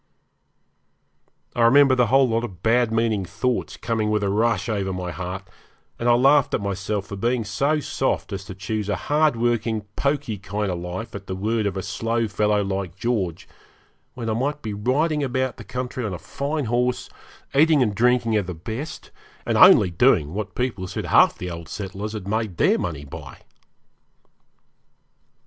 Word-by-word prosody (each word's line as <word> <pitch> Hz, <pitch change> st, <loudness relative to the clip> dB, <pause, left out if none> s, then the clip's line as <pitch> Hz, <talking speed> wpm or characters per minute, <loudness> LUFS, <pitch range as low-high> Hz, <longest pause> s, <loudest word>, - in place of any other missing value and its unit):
I 120 Hz, -, 0 dB
remember 135 Hz, +3 st, +6 dB
the 125 Hz, -2 st, +3 dB
whole 135 Hz, +3 st, +4 dB
lot 115 Hz, 0 st, 0 dB
of 95 Hz, -7 st, -8 dB
bad 115 Hz, 0 st, +3 dB
meaning 115 Hz, -3 st, +1 dB
thoughts 125 Hz, +7 st, -2 dB
coming 110 Hz, -2 st, -1 dB
with 105 Hz, -1 st, +1 dB
a 100 Hz, -, +1 dB
rush 110 Hz, -1 st, +1 dB
over 100 Hz, -3 st, -1 dB
my 90 Hz, -1 st, -4 dB
heart, 90 Hz, +3 st, -6 dB, 0.5 s
and 120 Hz, -, +1 dB
I 120 Hz, -, +6 dB
laughed 135 Hz, +3 st, +4 dB
at -, -, -1 dB
myself 100 Hz, 0 st, -2 dB
for 100 Hz, -, -7 dB
being 120 Hz, +4 st, 0 dB
so 140 Hz, +9 st, 0 dB
soft 135 Hz, -6 st, -2 dB
as 100 Hz, 0 st, -4 dB
to 95 Hz, -, -8 dB
choose 105 Hz, +2 st, -3 dB
a 105 Hz, -, +1 dB
hard 150 Hz, +6 st, +2 dB
working, 115 Hz, -1 st, 0 dB
pokey 140 Hz, -7 st, -1 dB
kind 105 Hz, 0 st, -3 dB
of 90 Hz, -, -3 dB
life 90 Hz, +6 st, -6 dB
at 100 Hz, -1 st, -8 dB
the 95 Hz, -, -3 dB
word 110 Hz, +2 st, 0 dB
of 100 Hz, -1 st, -3 dB
a 95 Hz, -, -3 dB
slow 115 Hz, +5 st, -1 dB
fellow 105 Hz, 0 st, +1 dB
like 95 Hz, -3 st, -3 dB
George, 95 Hz, -6 st, -2 dB, 0.7 s
when 120 Hz, -2 st, -5 dB
I 110 Hz, -, +1 dB
might 145 Hz, +6 st, -2 dB
be 110 Hz, -2 st, -3 dB
riding 145 Hz, +8 st, 0 dB
about 130 Hz, -1 st, -1 dB
the 120 Hz, -, -9 dB
country 125 Hz, +3 st, -4 dB
on 100 Hz, -5 st, -3 dB
a -, -, -5 dB
fine 140 Hz, -, -3 dB
horse, 125 Hz, +2 st, 0 dB, 0.5 s
eating 150 Hz, 0 st, +5 dB
and 105 Hz, -4 st, 0 dB
drinking 120 Hz, +1 st, +2 dB
of 100 Hz, -4 st, -1 dB
the 90 Hz, -, -5 dB
best, 115 Hz, -, -7 dB, 0.3 s
and -, -, 0 dB
only 90 Hz, -, +7 dB
doing 85 Hz, -, +3 dB
what 105 Hz, 0 st, -4 dB
people 120 Hz, -7 st, -2 dB
said -, -, -4 dB
half -, -, +5 dB
the 90 Hz, 0 st, -5 dB
old 85 Hz, -2 st, -8 dB
settlers 100 Hz, +2 st, -5 dB
had 105 Hz, -3 st, -6 dB
made 110 Hz, -4 st, -2 dB
their -, -, +3 dB
money 75 Hz, -5 st, -4 dB
by. 70 Hz, -, -9 dB
110 Hz, 180 wpm, -23 LUFS, 95-125 Hz, 0.7 s, only